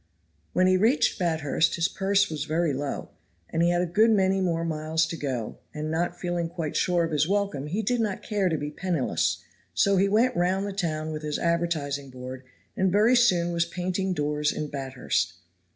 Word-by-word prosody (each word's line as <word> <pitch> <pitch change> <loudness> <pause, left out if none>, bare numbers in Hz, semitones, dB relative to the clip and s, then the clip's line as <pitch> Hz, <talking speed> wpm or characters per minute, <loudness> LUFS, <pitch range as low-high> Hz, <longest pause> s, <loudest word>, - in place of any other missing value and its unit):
When 185 - +3
he 185 0 +4
reached 225 +7 +2
Bathurst 160 -2 +1
his 170 0 +2
purse 195 +1 +1
was 150 -2 -3
very 160 0 0
low, 140 +1 -4 0.4
and 165 - 0
he 170 - +4
had 175 0 +2
a - - +1
good 210 +7 +3
many 195 -3 +3
more 170 -2 0
miles 160 0 0
to 160 - -5
go, 130 -8 -4 0.2
and 155 +1 -3
not 175 +2 -1
feeling 175 -2 -2
quite 165 -3 -4
sure 175 -2 +2
of 165 - -2
his 150 0 +2
welcome 200 -9 0
he 200 +8 -2
did 240 +3 +1
not 210 -4 -2
care 205 -4 0
to 160 - 0
be 145 0 -4
penniless, 170 -3 -1 0.3
so 200 -1 +3
he 195 +2 +3
went 235 +5 +3
round 185 +3 +1
the 200 - -4
town 160 -5 -2
with 155 -1 -4
his 150 -1 -2
advertising 160 -5 -1
board 130 0 -8 0.3
and 190 -1 +1
very 215 +6 +4
soon 180 -8 +3
was 170 0 +2
painting 185 +2 -2
doors 150 0 0
in 150 - -4
Bathurst. 135 -8 -2
170 Hz, 200 wpm, -26 LUFS, 155-190 Hz, 0.4 s, he